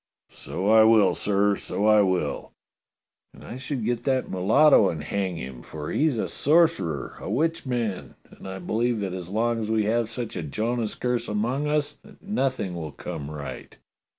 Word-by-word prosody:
" - - -64 0.2
So 95 +3 -3
I 110 +1 +7
will, 110 -3 +5
sir, 100 0 +1
so 100 - -3
I 105 -1 +6
will! 90 -6 -1 0.4
" - - -59
"And - - -14
I 120 - -8
should 130 -3 -4
get 120 0 -1
that 130 -2 0
mulatto 105 +5 +5
and 80 -3 -4
hang 95 +2 -2
him, 65 -4 -7
for 75 +4 -7
he's 150 -5 +1
a - - -1
sorcerer, 155 - +1
a - - -6
witchman; 125 - -2 0.2
and - - -12
I 95 - -5
believe 115 +5 -1
that 95 -2 -3
as 90 -2 -6
long 115 +3 0
as 110 -1 -3
we 110 -1 +2
have 115 +1 0
such 115 0 -5
a - - -3
Jonah's 110 - -2
curse 125 -1 -1
among 120 +8 -1
us 150 -1 -1
that - - -17
nothing 135 - -1
will 80 -3 -5
come 70 0 -7
right." 75 -2 -8
110 Hz, 185 wpm, -25 LUFS, 95-125 Hz, 0.4 s, I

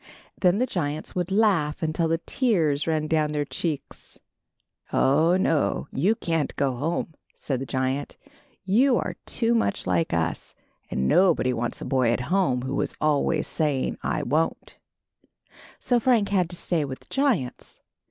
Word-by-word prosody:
Then 180 0 +3
the 250 - +2
giants 155 - -3
would 180 0 -2
laugh 190 -8 +2
until 160 +1 0
the 165 +1 +1
tears 165 - 0
ran 155 -1 0
down 155 -1 0
their 145 -1 -1
cheeks. 155 0 -5 0.7
"Oh, 160 +6 +3
no! 160 -5 0
you 190 +12 +2
can't 165 -7 -2
go 135 -2 0
home," 160 +5 -2 0.2
said 135 -4 -3
the 135 - -5
giant. 130 +2 -2 0.5
"You 240 +6 +4
are - - -3
too 230 0 +1
much 225 -3 0
like 165 - 0
us, 85 -1 -2 0.3
and 65 0 -1
nobody 170 - +3
wants 120 0 -3
a - - -5
boy 130 -4 +2
at 120 - 0
home 135 -11 +2
who 130 +1 -1
is - - -3
always 155 +1 +1
s^ing, 145 -5 0
T - - -1
won't.' 160 +3 -1 0.5
" - - -47 0.3
So 245 -1 +2
Frank 230 -4 +2
had 185 -4 +1
to 175 - -4
stay 170 -2 0
with 135 -2 -6
the - - -20
giants. 240 - -1
160 Hz, 160 wpm, -25 LUFS, 140-190 Hz, 0.7 s, You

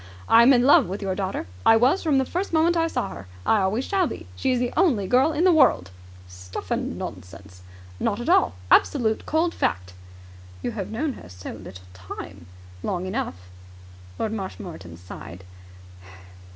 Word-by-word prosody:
I 230 - +7
am 240 +3 +7
in 245 -2 +5
love 270 -7 +6
with 195 +3 -5
your 190 -1 -1
daughter. 190 0 -3 0.2
I 225 - +6
was 260 +11 +3
from 305 -5 +2
the 265 - +2
first 365 +8 -3
moment 330 +2 +3
I 330 -1 +2
saw - - -2
her. 85 +2 -10 0.2
I 220 - +3
always 210 +7 0
shall 380 -3 +1
be. - - -7
She 260 - 0
is 250 - +2
the 245 0 -1
only 270 - +2
girl 260 +9 +3
in 315 +2 0
the 370 - +6
world!" 260 - +3 0.4
"Stuff 90 0 -9
and - - -2
nonsense!" 90 0 -9 0.4
"Not - - -1
at - - -5
all. 90 - +3 0.2
Absolute, 225 -6 +3
cold 330 +2 +1
fact." 90 0 -2 0.7
"You - - -1
have 205 -4 -5
known 270 +6 -2
her 90 - -12
so 90 +1 -8
little 95 -3 -11
time." 90 0 -10 0.3
"Long 180 - -2
enough." 185 - -4 0.7
Lord 220 - -2
Marshmoreton 175 - -7
sighed. 90 0 -10
215 Hz, 180 wpm, -24 LUFS, -, 0.7 s, I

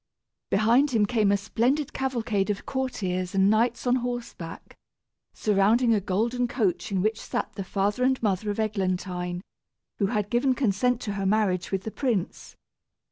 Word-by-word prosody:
Behind 235 +8 +4
him 225 -5 +2
came 210 -2 +2
a 200 - +3
splendid 245 +8 0
cavalcade 225 -7 -1
of 205 -1 -2
courtiers 190 -9 -2
and 195 +1 +4
knights 230 +3 +1
on 250 +1 +3
horseback, 240 -9 -6 0.6
surrounding 215 +4 +3
a 210 - +2
golden 230 +6 0
coach 215 -6 -1
in 190 -2 0
which 220 +1 0
sat - - -3
the 195 - -5
father 200 +5 -1
and 260 0 +2
mother 210 0 0
of 205 - -2
Eglantine, 185 -4 -2 0.6
who 200 - +2
had 210 -2 -2
given 255 +2 +2
consent 250 +1 +1
to 205 - -3
her 195 -1 -3
marriage 190 -4 +1
with 190 -1 -1
the 220 - -5
prince. 225 -10 -2
215 Hz, 160 wpm, -26 LUFS, 195-245 Hz, 0.6 s, Behind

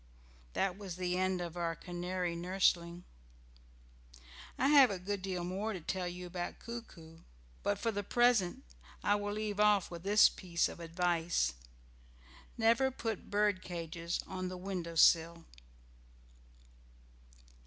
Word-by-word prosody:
That 195 0 -1
was 190 -4 -6
the 180 0 -1
end 185 0 0
of 170 -1 -5
our 170 -1 -2
canary 175 +1 -3
nursling. 175 -1 +1 1.5
I 270 - +2
have 280 -4 +8
a 200 - -2
good 195 +2 -4
deal 185 -2 -3
more 195 +5 -2
to 185 - -5
tell 180 +3 -2
you 180 +1 -6
about 175 0 -5
Coo 235 0 -6
coo, 165 -6 -15 0.4
but 205 0 0
for 230 +3 -1
the 205 -1 -2
present 230 -3 +2 0.4
I 205 - +3
will 205 0 -1
leave 210 -1 -3
off 210 -3 +4
with 170 -1 -7
this 205 +3 +6
piece 175 -2 -1
of - - -9
advice. 170 - 0 1.0
"Never 230 +3 +3
put 225 -5 -5
bird 205 -2 +2
cages 170 -1 -4
on 185 -1 -4
the 185 - -6
window 180 -3 -5
sill." 165 0 +4
185 Hz, 140 wpm, -33 LUFS, 175-205 Hz, 1.5 s, have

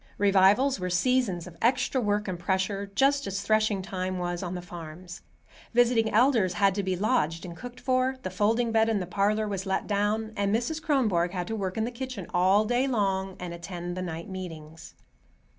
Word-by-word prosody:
Revivals 200 +6 +4
were 180 0 -2
seasons 190 -2 +1
of 180 -2 -11
extra 255 +2 +2
work 210 -1 0
and 180 -2 -3
pressure, 195 +2 -1
just 280 +3 +3
as 195 0 -3
threshing 215 -2 +1
time 185 -1 -3
was 175 -1 -3
on 180 -1 -4
the 180 - -4
farms. 175 0 -9 0.5
Visiting 235 -2 +4
elders 220 -5 +3
had 195 +1 +3
to 200 - -1
be 190 -1 -1
lodged 180 -6 0
and 170 -1 -8
cooked 245 +3 -9
for, 255 0 +1
the 185 - -4
folding 225 +5 +1
bed 225 0 +3
in 220 -2 +1
the 180 - -3
parlor 205 +4 +1
was 195 -1 -4
let 190 - 0
down, 210 +2 0
and 200 +1 +1
Mrs. 275 +8 -2
Kronborg 210 - +1
had 180 -2 -2
to 225 - -4
work 190 -2 -3
in 220 - +1
the 235 - -2
kitchen 250 -5 -6
all 190 +4 +4
day 245 +4 +1
long 195 -6 0
and 180 -1 -5
attend 175 0 -6
the 185 - -4
night 170 -1 -5
meetings. 165 -4 -8
200 Hz, 195 wpm, -27 LUFS, 180-225 Hz, 0.5 s, Revivals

